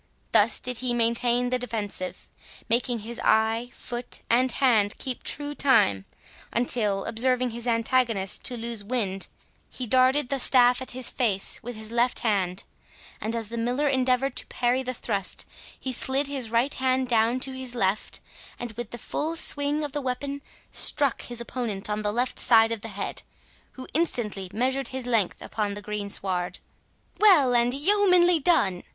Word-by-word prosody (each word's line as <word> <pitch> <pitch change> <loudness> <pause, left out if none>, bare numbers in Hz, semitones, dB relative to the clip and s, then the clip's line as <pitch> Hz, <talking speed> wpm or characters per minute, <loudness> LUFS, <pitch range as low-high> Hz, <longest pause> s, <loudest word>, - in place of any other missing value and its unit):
Thus - - +5
did 250 -2 -3
he 250 -1 -1
maintain 240 +1 +1
the 255 - 0
defensive, 210 -6 -4 0.4
making 240 0 0
his 235 +1 -5
eye, 220 +2 +2
foot, 240 0 -4
and 250 +2 +3
hand 220 -6 +2
keep 260 -2 -5
true 290 0 0
time, 105 - +2 0.5
until, 215 -5 0
observing 250 +2 0
his 235 +1 -3
antagonist 230 -4 0
to 245 - +1
lose 230 -2 -5
wind, 200 -4 -2 0.4
he 255 - -7
darted 255 +3 +3
the 275 - -1
staff 245 -1 +5
at 260 - -6
his 255 - +4
face 205 -6 +1
with 245 +1 -7
his 215 0 -6
left 240 +1 +1
hand; 195 -4 -1 0.6
and, 220 +2 -3
as 225 -2 -4
the 235 0 -5
Miller 250 +6 0
endeavoured 260 0 +1
to - - 0
parry 245 +1 0
the 255 -1 -4
thrust, 195 -4 -1 0.3
he 260 - -3
slid 265 +3 +2
his 270 -5 -3
right 235 +5 +1
hand 260 0 0
down 235 +1 +2
to 270 - 0
his 260 -2 -5
left, 195 -2 -1 0.4
and 240 -1 -6
with 230 0 -7
the 240 - -7
full 310 +7 -3
swing 295 -1 +3
of 295 - -4
the 290 +1 -3
weapon 275 +2 -4 0.3
struck 280 -3 +2
his 240 -1 -3
opponent 230 -4 -4
on 210 +1 -2
the 210 -1 -1
left 245 +4 -2
side 225 -1 +5
of 225 -2 -3
the 225 - -7
head, 200 -2 -5 0.5
who 260 - -9
instantly 215 - 0
measured 260 +3 -1
his 260 -1 -6
length 225 -7 0
upon 205 -2 -3
the - - -6
green 210 -1 -5
sward. 180 -3 -2 0.6
"Well 340 -12 +5
and 240 0 +3
yeomanly 360 +1 +4
done!" 205 - +2
245 Hz, 170 wpm, -25 LUFS, 220-260 Hz, 0.6 s, Thus